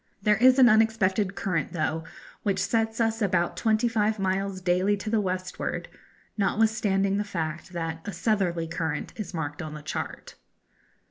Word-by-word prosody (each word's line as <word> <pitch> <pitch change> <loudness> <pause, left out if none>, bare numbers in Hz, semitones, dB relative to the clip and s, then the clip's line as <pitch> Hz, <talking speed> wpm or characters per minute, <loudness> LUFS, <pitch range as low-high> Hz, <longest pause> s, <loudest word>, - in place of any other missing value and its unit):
There 210 +1 +3
is 255 +3 +6
an 260 -2 +8
unexpected 215 -3 +3
current, 170 -4 -2
though, 160 -1 -1 0.4
which 200 -2 0
sets 220 +4 0
us 225 0 +1
about 180 -4 +1
twenty 220 +1 +2
five 220 -1 +1
miles 195 0 -1
daily 185 +3 +2
to 215 +2 -5
the 225 -2 +3
westward, 185 -1 -3 0.5
notwithstanding 200 -2 +1
the 205 - 0
fact 165 -3 -4
that 165 -1 -3
a - - -2
'southerly 175 -3 0
current' 160 -2 -3
is 200 -4 -6
marked 145 -1 -4
on 155 -2 -6
the 150 - -9
chart. - - -5
195 Hz, 155 wpm, -27 LUFS, 175-215 Hz, 0.5 s, an